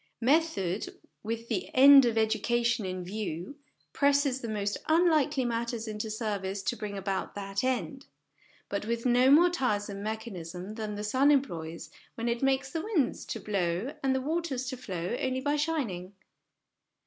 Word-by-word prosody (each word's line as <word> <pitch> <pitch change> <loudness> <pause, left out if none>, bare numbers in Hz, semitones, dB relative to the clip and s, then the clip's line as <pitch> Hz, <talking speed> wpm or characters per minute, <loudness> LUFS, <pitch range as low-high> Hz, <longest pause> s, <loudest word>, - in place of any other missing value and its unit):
Method, 240 - +1 0.2
with 230 +1 -4
the 210 -6 -2
end 275 0 +9
of 230 -2 0
education 235 0 +1
in 185 0 -4
view, 195 - -5 0.4
presses 280 -2 +2
the 235 - -4
most 205 -1 -1
unlikely 310 -5 +3
matters 235 -1 -2
into 215 0 -4
service 205 -3 -3
to 240 - -1
bring 210 -3 -5
about 195 0 -3
that 195 +1 -3
end; 260 +1 -2 0.6
but 200 0 -3
with 230 +1 -2
no 250 +1 +5
more 340 +5 +6
tiresome 205 - -1
mechanism 200 -4 -5
than 215 -1 -4
the 205 - -5
sun 260 +7 +3
employs 170 - -1 0.2
when 230 +1 -3
it 235 0 -1
makes 270 0 +1
the 325 - -2
winds 365 - 0
to 225 - -5
blow 195 - -1
and 265 -1 +1
the 265 - 0
waters 295 -3 -2
to 260 0 -4
flow 185 -5 -4
only 260 0 0
by 290 +2 0
shining. 255 - -2
230 Hz, 160 wpm, -29 LUFS, 200-270 Hz, 0.6 s, end